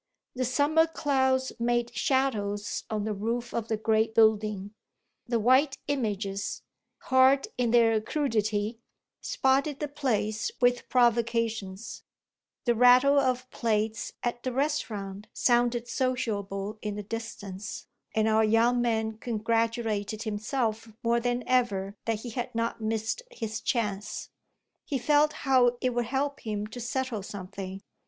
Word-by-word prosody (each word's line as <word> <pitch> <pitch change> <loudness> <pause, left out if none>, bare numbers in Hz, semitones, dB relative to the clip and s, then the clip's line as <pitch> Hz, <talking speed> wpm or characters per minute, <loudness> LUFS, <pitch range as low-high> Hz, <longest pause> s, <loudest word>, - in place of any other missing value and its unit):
The 255 0 -1
summer 290 +6 +3
clouds 265 -4 +1
made 240 0 0
shadows 210 -6 0
on 215 -2 -1
the 215 0 -1
roof 230 +4 -3
of 230 -1 -2
the 220 - 0
great 220 0 +1
building; 215 -2 +3 0.5
the 235 -1 +1
white 265 +5 +4
images, 205 -7 -2 0.4
hard 260 +6 +4
in 245 -2 +1
their 225 -2 +4
crudity, 220 -4 -1 0.4
spotted 270 +2 +1
the 295 - -2
place 225 -7 -1
with 245 0 +2
provocations; 230 -4 0 0.6
the 240 - +4
rattle 250 +4 +6
of 255 -1 0
plates 220 -1 -1
at 240 0 -2
the 255 - -2
restaurant 215 -8 -2
sounded 240 -1 +2
sociable 215 -5 -2
in 210 -1 -3
the 210 - -5
distance, 205 -3 -6 0.3
and 220 0 +3
our 220 0 +4
young 230 +3 +3
man 220 -2 0
congratulated 225 -2 -1
himself 220 +1 -2
more 235 0 +3
than 245 +1 -1
ever 205 -6 +1
that 225 -2 -1
he 240 - -6
had 240 0 -4
not 230 0 -1
missed 220 - -1
his 225 - -5
chance. 210 -3 -2 0.5
He 280 - -2
felt 295 +4 +3
how 250 -2 +4
it 255 - 0
would 240 0 0
help 275 +3 -1
him 210 -2 -3
to 220 +3 -8
settle 240 -2 -2
something. 195 0 -7
230 Hz, 130 wpm, -28 LUFS, 215-255 Hz, 0.6 s, rattle